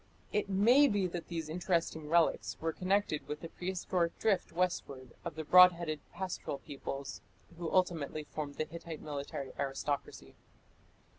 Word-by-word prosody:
It 210 -1 0
may 235 +9 +6
be 205 -6 +1
that 175 -2 -4
these 165 -2 -4
interesting 165 -2 -1
relics 170 0 +2
were 165 0 -1
connected 185 -3 0
with 150 +1 -5
the 165 - -6
prehistoric 180 -1 -1
drift 200 -5 +1
westward 145 -8 -2
of 170 -3 -5
the 160 - -4
broad 180 +3 +9
headed 165 -3 -4
pastoral 185 -5 -4
peoples 140 -1 -6 0.3
who 170 -1 -4
ultimately 165 -5 +1
formed 150 -1 -5
the 155 - -1
Hittite 165 -1 -8
military 140 -2 -5
aristocracy. 140 +1 -3
170 Hz, 145 wpm, -33 LUFS, 150-180 Hz, 0.3 s, broad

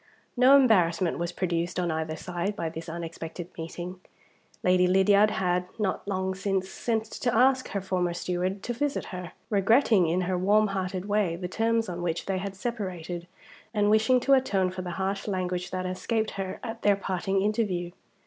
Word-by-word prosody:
No 255 +2 +7
embarrassment 185 -11 +3
was 170 0 -2
produced 175 -1 -1
on 175 -2 0
either 160 0 -2
side 180 +4 -3
by 165 -6 -2
this 165 +1 -7
unexpected 165 +1 -6
meeting. 175 +2 -6 0.6
Lady 180 0 +4
Lydiard 200 +3 +5
had, 180 -3 0
not 205 -2 -2
long 190 -1 -1
since, 190 0 -1
sent 225 -2 -1
to 240 +2 -2
ask 260 +1 +4
her 200 - -3
former 185 -2 0
steward 180 +2 -2
to 240 - -2
visit 285 +4 -1
her; 180 -2 -6 0.2
regretting, 210 - +4
in 175 +3 +1
her 180 0 -1
warm 210 +3 +3
hearted 190 -1 -3
way, 205 -5 +1
the 180 +1 -4
terms 225 +3 +1
on 175 -1 -5
which 175 -1 -2
they 190 -1 -1
had 195 0 -5
separated, 185 -6 -4 0.5
and 205 0 +3
wishing 220 +4 +4
to 275 - +3
atone 200 -9 +2
for 185 0 -5
the 180 - -5
harsh 195 +1 -2
language 180 -2 -2
that 185 0 -3
had 185 0 -2
escaped 220 +2 -1
her 190 -1 -5
at 225 -2 -6
their 205 -1 +4
parting 195 0 -1
interview. 200 -5 0
190 Hz, 180 wpm, -27 LUFS, 180-210 Hz, 0.6 s, No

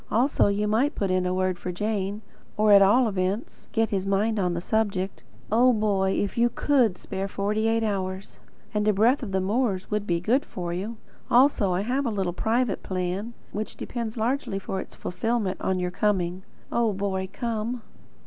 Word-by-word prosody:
Also 245 +3 +3
you 205 +1 +1
might 245 +8 +2
put 195 -2 -1
in 185 0 +1
a 180 - 0
word 185 -1 0
for 180 - -4
Jane; 205 +2 -2 0.3
or 215 0 +4
at 200 -1 +9
all 230 +6 +5
events, 195 +2 -3
get 225 - +2
at 225 - -1
his 195 -1 -1
mind 210 +3 +1
on 180 -2 0
the - - -1
subject. 195 -1 -1 0.3
Oh, 245 +3 +5
Boy, 200 -4 +1
if 205 +3 -1
you 240 +1 +4
COULD 240 -9 +2
spare 195 +2 -4
forty 210 +3 -1
eight 225 0 +2
hours! 190 -2 -3 0.3
And 210 0 0
a 215 - +5
breath 230 +7 +3
of 225 -6 -5
the 190 - +1
moors 200 0 0
would 210 0 -1
be 170 -1 +1
good 240 +11 +2
for 175 -8 -5
you. 205 +6 -4 0.3
Also 245 -6 +4
I 180 +1 +1
have 255 +5 0
a - - +1
little 190 -5 -1
private 225 +2 0
plan, 185 +5 -3 0.2
which 215 +1 -5
depends 235 -2 -4
largely 230 -2 -1
for 195 0 -4
its - - -11
fulfilment 210 +1 -2
on 190 -1 0
your 180 0 -1
coming. 185 -2 0 0.3
Oh, 230 -3 +2
Boy 190 -1 -2
come! 230 0 -3
205 Hz, 195 wpm, -26 LUFS, 190-225 Hz, 0.3 s, at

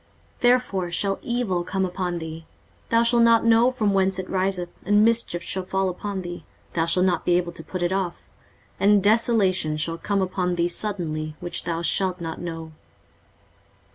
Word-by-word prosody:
23:047:011 - - -32
Therefore 245 -8 +2
shall 195 +2 0
evil 235 -8 -1
come 190 +1 -1
upon 180 -1 -3
thee; 160 0 -7 0.4
thou 230 0 +4
shalt 235 0 +3
not 230 -1 +5
know 230 +2 +5
from 220 -6 0
whence 190 -1 +2
it 185 -1 -4
riseth: 185 -2 -1
and 205 +2 +4
mischief 225 -7 +2
shall 190 - -3
fall 190 +1 -1
upon 190 +1 -5
thee; 175 0 -7 0.3
thou 165 -1 0
shalt 180 +2 +2
not 185 - +1
be 175 0 +3
able 175 -1 -2
to 165 - -10
put 185 +1 -4
it 175 - 0
off: 190 -3 -3 0.5
and 205 -1 +4
desolation 205 -7 +2
shall 165 +2 -2
come 200 -2 0
upon 180 -1 -1
thee 170 0 +1
suddenly, 165 -5 -3
which 175 -1 -4
thou 170 -1 -2
shalt 185 +1 +1
not 165 -1 -5
know. 165 -2 -6
185 Hz, 180 wpm, -24 LUFS, 175-205 Hz, 0.5 s, not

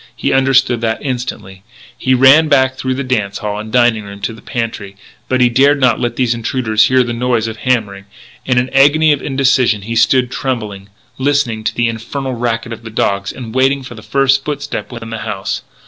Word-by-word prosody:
He - - -1
understood 135 -3 +2
that 110 -1 0
instantly. 125 -8 -5 0.3
He 130 0 +1
ran 135 +5 +6
back 130 -3 +3
through 130 0 -3
the 140 - -3
dance 105 -6 -1
hall 105 0 -4
and 110 0 -8
dining 120 -3 +2
room 100 0 -10
to 115 - -3
the 115 - -13
pantry; 115 -5 -5 0.3
but 130 -1 +1
he 125 - +6
dared 140 +4 +3
not 125 -4 +2
let 120 -1 -2
these 125 -2 +1
intruders 115 -2 +1
hear 130 0 +3
the 120 -1 -4
noise 120 -1 0
of 110 0 -6
hammering. 105 -5 -1 0.4
In 125 -1 0
an 125 +1 +1
agony 150 +3 +4
of 145 - -4
indecision 130 -6 +1
he 115 +3 -4
stood 125 +2 +3
trembling, 105 -8 -4 0.3
listening 130 -5 0
to - - -1
the 120 0 +1
infernal 125 +4 -4
racket 115 -1 -2
of 115 - -9
the 115 - -9
dogs, 100 -2 -1
and 115 -4 -9
waiting 135 +1 +1
for 125 - -9
the 110 - -11
first 135 +4 +1
footstep 145 -1 -5
within 115 -2 -8
the 115 - -4
house. 100 -4 -4
120 Hz, 205 wpm, -15 LUFS, 110-130 Hz, 0.4 s, ran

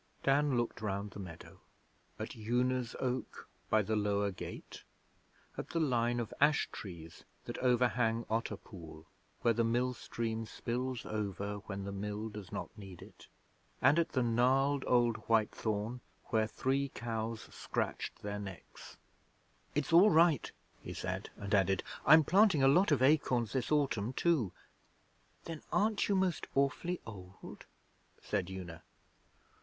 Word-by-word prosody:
Dan 140 -1 +3
looked 120 -1 -2
round 100 -1 -3
the - - -9
meadow 90 -4 -10 0.6
at - - -6
Una's 120 +2 0
Oak 130 0 -3 0.2
by 110 -1 +4
the 110 +2 -1
lower 100 -1 +1
gate; 95 - -8 0.8
at - - -5
the 165 - -1
line 120 -5 +1
of 115 -1 -4
ash 145 +1 +4
trees 85 -4 -9 0.2
that - - -5
overhang 120 -2 +2
Otter 110 -2 -1
Pool 80 -6 -12 0.4
where 115 - +4
the 115 +1 +1
mill 120 +2 +1
stream 115 -2 -4
spills 125 +2 -3
over 105 -1 -3
when 100 -1 -4
the 100 - -4
Mill 105 +2 -4
does 105 -3 -9
not - - -5
need 95 -5 -10
it, - - -16 0.5
and 140 +6 +5
at 170 - 0
the 130 -3 +2
gnarled 130 +4 +2
old 120 -2 +3
white 110 -2 +3
thorn 110 +3 -3 0.3
where 110 -1 +2
Three 135 +4 0
Cows 115 -1 -3
scratched - - -3
their 105 0 -3
necks. 95 -3 -10 0.8
'It's 150 +2 0
all 185 +5 +8
right,' 165 - +4 0.3
he - - -7
said; - - -4
and 100 0 -5
added, 95 -2 +3 0.2
'I'm 155 +2 +9
planting 185 -3 +4
a - - +7
lot 170 +6 +5
of 135 -3 +3
acorns 130 -6 +3
this 130 -1 -1
autumn 130 -6 +1
too.' 140 - +2 0.9
'Then 165 -2 -6
aren't 215 0 +2
you 200 - +3
most 185 -4 0
awfully 140 +6 +1
old?' 95 -4 -10 0.5
said 90 - -2
Una. 90 -3 -7
115 Hz, 145 wpm, -33 LUFS, 105-135 Hz, 0.9 s, I'm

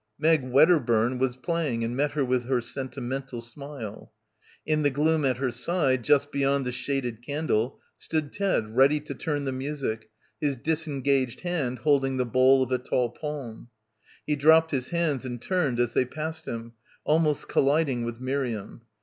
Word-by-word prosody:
Meg 160 0 +3
Wedderburn 130 -4 +3
was 130 -1 0
playing 145 -6 -1
and 115 +1 -2
met 145 +2 0
her 145 -2 +1
with 125 -1 0
her 130 0 +1
sentimental 130 0 -5
smile. 120 -2 -8 0.5
In 155 -1 +1
the 145 - +3
gloom 155 +3 +1
at 130 -3 +1
her 130 -1 -1
side, 130 +1 0
just 145 +1 +3
beyond 140 -1 +1
the 125 - -2
shaded 125 -2 -2
candle, 135 -3 -1 0.2
stood 155 -3 -3
Ted 150 - -1
ready 140 +4 +5
to 150 - -6
turn 145 -2 -3
the 135 - -1
music, 130 -5 -4 0.3
his 145 -4 0
disengaged 140 -4 0
hand 155 -9 -2
holding 135 0 +2
the 125 - +1
bole 130 +2 +4
of 130 - -6
a 130 - +2
tall 125 -1 0
palm. 135 -6 -7 0.6
He 150 - +1
dropped 160 +3 +5
his 130 -3 -1
hands 165 -6 0
and 120 -2 -5
turned 150 -5 0
as 120 -1 +1
they 125 - +3
passed 160 +4 -6
him, 115 0 -6 0.3
almost 150 -1 +2
colliding 140 -3 +2
with 115 0 -5
Miriam. 130 -5 -3
135 Hz, 165 wpm, -26 LUFS, 125-150 Hz, 0.6 s, ready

